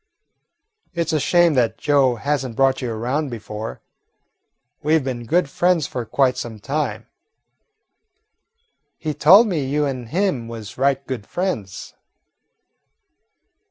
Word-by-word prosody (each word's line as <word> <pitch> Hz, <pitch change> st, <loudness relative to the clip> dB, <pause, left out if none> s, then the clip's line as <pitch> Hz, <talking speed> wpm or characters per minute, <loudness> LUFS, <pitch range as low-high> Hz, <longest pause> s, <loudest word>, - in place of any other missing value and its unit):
"It 170 Hz, -1 st, -1 dB
's -, -, -1 dB
a 155 Hz, -, +2 dB
shame 175 Hz, +2 st, +3 dB
that 125 Hz, -4 st, +1 dB
Joe 140 Hz, -4 st, +3 dB
has 140 Hz, +3 st, -1 dB
n't 125 Hz, -3 st, -6 dB
brought 135 Hz, +1 st, +2 dB
you 125 Hz, -2 st, -3 dB
around 130 Hz, +7 st, -2 dB
before. 110 Hz, -1 st, -7 dB, 1.0 s
We 155 Hz, +2 st, +3 dB
've 155 Hz, -, -2 dB
been 120 Hz, -3 st, -4 dB
good 175 Hz, +2 st, +2 dB
friends 175 Hz, +1 st, +1 dB
for 125 Hz, -2 st, -4 dB
quite 130 Hz, +3 st, +1 dB
some 110 Hz, -2 st, -6 dB
time." 125 Hz, -3 st, -3 dB, 1.9 s
"He 155 Hz, -1 st, -3 dB
told 190 Hz, +11 st, +7 dB
me 175 Hz, -9 st, -1 dB
you 145 Hz, +3 st, 0 dB
an' 130 Hz, -4 st, -4 dB
him 155 Hz, -, -1 dB
was 110 Hz, -3 st, -8 dB
right 135 Hz, +1 st, +1 dB
good 125 Hz, -6 st, -5 dB
friends." 145 Hz, -, -4 dB
135 Hz, 135 wpm, -21 LUFS, 120-155 Hz, 1.9 s, told